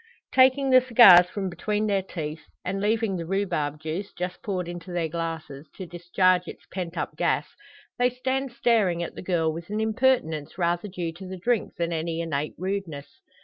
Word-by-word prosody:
Taking 265 +1 +5
the 255 0 +8
cigars 220 -8 +8
from 195 0 -3
between 210 +4 -2
their 200 -2 +1
teeth 155 -4 -6 0.2
and 195 +2 -2
leaving 215 -2 +1
the 165 - -4
rhubarb 170 -6 -1
juice, 160 +6 -4
just 180 +1 -5
poured 185 -4 -3
into 175 +1 -7
their 175 -2 -1
glasses, 160 -3 -5
to 190 - -7
discharge 180 +1 +1
its - - -10
pent 180 -2 -4
up - - -3
gas - - +1 0.5
they 245 0 +4
stand 260 +1 -2
staring 225 -8 +2
at - - -6
the - - -8
girl, 165 -4 0
with 170 +3 -8
an 210 +1 -2
impertinence 220 - +1
rather 175 +2 0
due 175 -4 -4
to 185 +3 -10
the 190 0 -6
drink 230 +4 -1
than 170 0 -2
any 165 0 -2
innate 150 -3 -2
rudeness. 175 -7 -5
180 Hz, 185 wpm, -26 LUFS, 165-210 Hz, 0.5 s, the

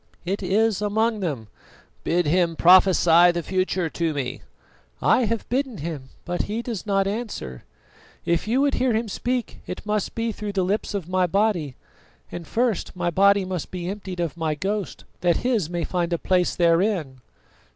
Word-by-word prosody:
"It 195 +4 -2
is 210 +2 +1
among 220 +2 +1
them." 145 - -3 0.6
"Bid 175 +1 +1
him 170 +2 +2
prophesy 175 -1 +6
the 170 -1 -3
future 185 -1 0
to 160 -1 -2
me." 130 -3 -3 0.6
"I 255 - +3
have 230 0 -2
bidden 260 -2 -1
him, 145 -4 -6 0.2
but 175 0 -1
he 220 +3 -3
does 225 -4 -5
not 195 -1 +2
answer. 200 - -5 0.6
If 170 +3 0
you 250 +5 +2
would 285 0 +2
hear 255 -2 +1
him 225 +1 -1
speak, 245 +3 -3
it 180 - -6
must 210 -1 -2
be 230 0 -1
through 210 -1 -5
the 190 -2 +1
lips 205 +2 -1
of 185 -5 -3
my 185 0 +1
body; 180 - 0 0.6
and 170 -2 -7
first 235 -6 -1
my 175 -1 -1
body 200 +2 +4
must 185 -3 -4
be 175 -1 -5
emptied 190 -2 -6
of 170 -5 -2
my 160 -2 -1
ghost, 200 +5 -3 0.2
that 175 -2 +2
his 225 -10 +1
may 175 -1 -2
find 175 -1 -1
a - - +1
place 180 +1 +1
therein." 170 - +1
185 Hz, 175 wpm, -24 LUFS, 170-210 Hz, 0.6 s, prophesy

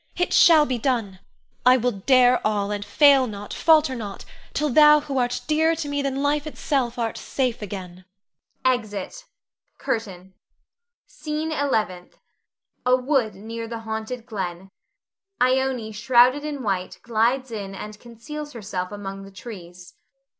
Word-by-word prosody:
It 355 - -1
shall 320 -3 +7
be 255 -4 -2
done! 225 -7 -1 0.4
I 255 +1 +6
will 245 0 0
dare 250 +4 +4
all, 205 -1 0
and 205 0 -3
fail 275 +3 +5
not, 205 -2 -7
falter 310 -4 +4
not, 205 -5 -7 0.3
till 300 0 -1
thou 300 +2 +7
who 275 -2 -2
art 245 0 -1
dearer 320 +2 +2
to 315 -2 -4
me 285 0 -1
than 275 0 -2
life 295 +1 0
itself 265 -5 -2
art 230 -2 -2
safe 250 -4 -2
again. 185 -3 -8 0.6
[Exit. 245 - -2 0.5
CURTAIN. 190 -5 -4 0.7
SCENE 305 +1 -4
ELEVENTH. 220 - -2 0.7
[A 250 0 +4
wood 255 -5 0
near 225 +3 -7
the 230 0 -6
haunted 220 +2 -5
glen. 190 -4 -5 0.7
Ione 255 -3 +1
_shrouded 245 +5 +4
in 290 -3 -5
white 190 -4 -2
glides 240 +3 0
in 200 -3 -6
and 210 +2 -8
conceals 295 +6 -9
herself 195 -5 -5
among 195 -1 -7
the 195 - -11
trees. 180 -4 -11
240 Hz, 140 wpm, -23 LUFS, 205-275 Hz, 0.7 s, shall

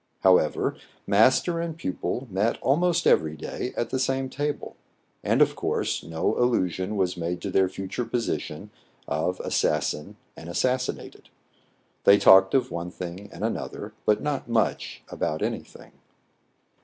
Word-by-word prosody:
However, 90 -5 +3 0.3
master 130 - +3
and 165 -1 -4
pupil 125 - -3
met 100 +5 0
almost 170 +5 +2
every 80 0 +3
day 125 - -5
at 120 - -2
the 130 - 0
same 135 0 -1
table; 145 +1 -3 0.5
and, - - +4
of - - -1
course, - - -1
no 80 -1 -1
allusion 105 -4 0
was 90 -2 0
made 85 +1 -3
to 100 - -4
their 95 0 +3
future 95 +5 -4
position 120 -1 -3 0.4
of - - -1
assassin 75 0 -1 0.2
and 80 - -10
assas 125 +8 +1
sinated. - - -13 0.8
They 100 - +8
talked 95 +1 +7
of 135 - +1
one 85 +1 -4
thing 90 +2 -7
and - - -8
another, - - -4
but 105 0 +3
not 145 -4 -2
much 115 -1 -1
about 75 - -2
any - - -1
thing. - - -16
100 Hz, 145 wpm, -26 LUFS, 90-130 Hz, 0.8 s, They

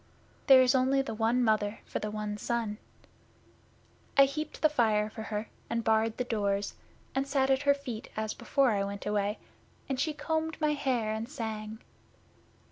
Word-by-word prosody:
There 265 -2 +9
is 250 - +4
only 265 +1 +3
the 270 - -5
one 230 +3 +2
Mother 215 -2 +1
for - - -3
the 210 - -3
one 210 0 -3
son. 225 -1 -2 1.4
I 275 - +9
heaped 305 +4 -5
the - - +8
fire 220 -7 +2
for 220 - -7
her, 215 0 -4 0.2
and 230 0 -1
barred 220 0 +2
the 250 - 0
doors, 205 -4 -1 0.4
and 270 +1 0
sat 270 -1 +2
at 265 0 +3
her 285 0 +4
feet 250 -6 -7
as 220 0 -1
before 275 -3 +2
I 200 -2 +1
went 200 0 -5
away, 210 0 0 0.5
and 270 -2 -2
she 310 +2 0
combed 320 +1 -2
my 305 -1 +2
hair, 255 -7 0
and 220 +2 -4
sang. 220 -4 -5
230 Hz, 175 wpm, -30 LUFS, 215-275 Hz, 1.4 s, There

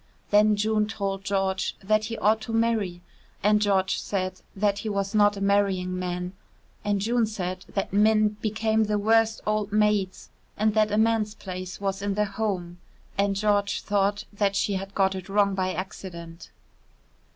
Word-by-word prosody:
Then 210 +1 +5
June 215 0 +1
told 195 -3 -3
George 195 -1 -1
that 215 +2 +2
he 230 +1 -4
ought 215 +2 +2
to 225 +1 -6
marry, 220 -6 0 0.4
and 210 +1 +4
George 195 -2 +2
said 185 -2 -3
that 200 0 +1
he 215 - -4
was 200 0 -2
not 205 -1 +4
a - - -6
marrying 195 -2 +1
man, 180 0 -3 0.5
and 205 -1 0
June 230 +2 +1
said 185 -3 -4
that 195 -1 -3
men 215 +1 +4
became 220 0 +1
the 210 0 0
worst 225 +1 +2
old 215 -1 0
maids 210 -3 +1 0.3
and 215 0 +2
that 215 -1 +2
a 210 - +1
man's 220 -1 +2
place 185 -1 -7
was 195 -1 -2
in 200 -1 -1
the 210 0 +2
home 195 -4 -3 0.4
and 200 0 +1
George 205 0 +1
thought 205 0 +1
that 200 -1 0
she 200 0 +1
had 195 +1 -5
got 190 -1 +2
it 190 0 -7
wrong 200 0 +3
by 185 -1 0
accident. 170 -3 -7
200 Hz, 170 wpm, -26 LUFS, 190-215 Hz, 0.5 s, Then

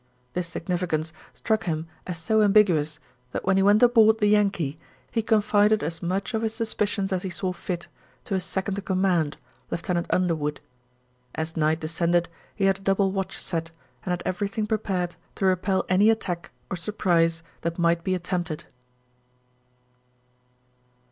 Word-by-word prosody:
This 180 -1 -2
significance 165 -2 -2 0.2
struck 220 -5 -1
him 160 -2 -1 0.2
as 180 -2 -4
so 215 +7 +2
ambiguous 185 -8 +4 0.4
that - - -3
when 190 +1 +3
he 195 - +4
went 205 +4 +5
aboard 225 -2 +6
the 215 - +1
Yankee 195 -8 +2 0.3
he 225 - +1
confided 210 -1 +3
as 165 +2 -4
much 190 +6 -2
of 220 - 0
his 220 -1 -1
suspicions 210 -3 0
as 185 - 0
he 190 - -4
saw 185 +1 -2
fit 175 0 -5 0.4
to - - -5
his 190 -1 0
second 190 +2 -2
in - - -8
command, 185 -6 +1 0.3
Lieutenant 170 0 -2
Underwood. 155 -5 0 0.8
As 160 +1 -3
night 155 0 +1
descended 170 +2 +1 0.3
he 195 - +1
had 195 0 +3
a - - -18
double 195 0 +2
watch 195 0 -3
set 165 -2 -3 0.3
and - - -5
had 180 -1 -1
everything 200 +4 -1
prepared 190 -5 -1 0.2
to 195 - -1
repel 190 +1 +2
any 195 +4 +5
attack 180 -6 -1 0.2
or 190 - -1
surprise 165 -3 +1 0.2
that 170 0 -2
might 170 -1 +2
be 185 +1 +1
attempted. 175 -3 -3
185 Hz, 155 wpm, -25 LUFS, 170-205 Hz, 0.8 s, aboard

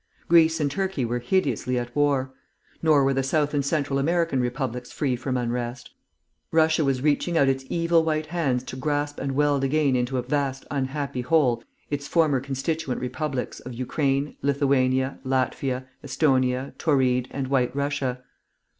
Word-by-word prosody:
Greece 165 -1 +5
and 145 -2 0
Turkey 190 -7 -1
were 120 +1 -1
hideously 125 - 0
at 120 0 -4
war. 140 -3 +1 0.5
Nor 155 -4 +4
were 135 0 +2
the 135 - +1
South 145 +2 0
and 145 -1 +1
Central 140 -1 0
American 165 -1 +1
republics 125 0 -3
free 135 -5 0
from 130 +1 -2
unrest. 120 0 -3 0.6
Russia 160 0 +3
was 135 -2 0
reaching 155 +3 +1
out 140 - +4
its 135 0 0
evil 170 -1 +2
White 155 -1 0
hands 150 -7 -1
to 130 - -7
grasp 145 +2 -2
and 135 0 -2
weld 145 0 +2
again 140 -1 +2
into 125 +1 0
a 125 - -1
vast 135 0 -2
unhappy 140 -1 -2
whole 125 -4 +2 0.3
its 145 0 -3
former 155 -5 +3
constituent 135 +1 -2
republics 130 +1 -3
of 125 - -8
Ukraine, 135 +3 -1
Lithuania, 135 -2 +1
Latvia, 130 0 -1 0.2
Esthonia, 130 -2 +1
Tauride, 130 -5 +2
and 135 -2 -4
White 130 -2 +1
Russia. 140 -3 -2
135 Hz, 155 wpm, -25 LUFS, 130-150 Hz, 0.6 s, Greece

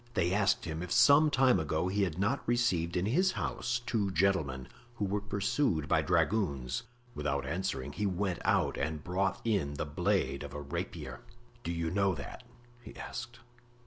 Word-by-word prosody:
They 90 -2 +2
asked 100 0 +2
him 80 -1 -4
if 90 -1 -6
some 150 +7 +6
time 130 -3 +4
ago 80 +3 0
he 100 +2 0
had 90 -5 0
not 105 +8 +1
received 95 -9 +1
in 90 - +1
his 185 - +2
house 120 0 -2
two 105 -5 0
gentlemen 80 -8 +1 0.3
who 105 - -1
were 100 +1 -1
pursued 100 - 0
by - - +3
dragoons; 70 - 0 0.3
without 70 -2 -2
answering 75 -7 -3
he 105 +6 -1
went 95 -1 -1
out - - +2
and 80 -2 -2
brought 95 +2 0
in 95 -11 0
the 75 - -2
blade 85 -1 0
of 70 -1 -7
a - - -3
rapier. 75 -3 -5 0.4
"Do 85 - -2
you 85 -1 -2
know 100 -1 +2
that?" 70 - -8 0.4
he 115 - -12
asked. 120 0 -7
95 Hz, 175 wpm, -31 LUFS, 80-105 Hz, 0.4 s, some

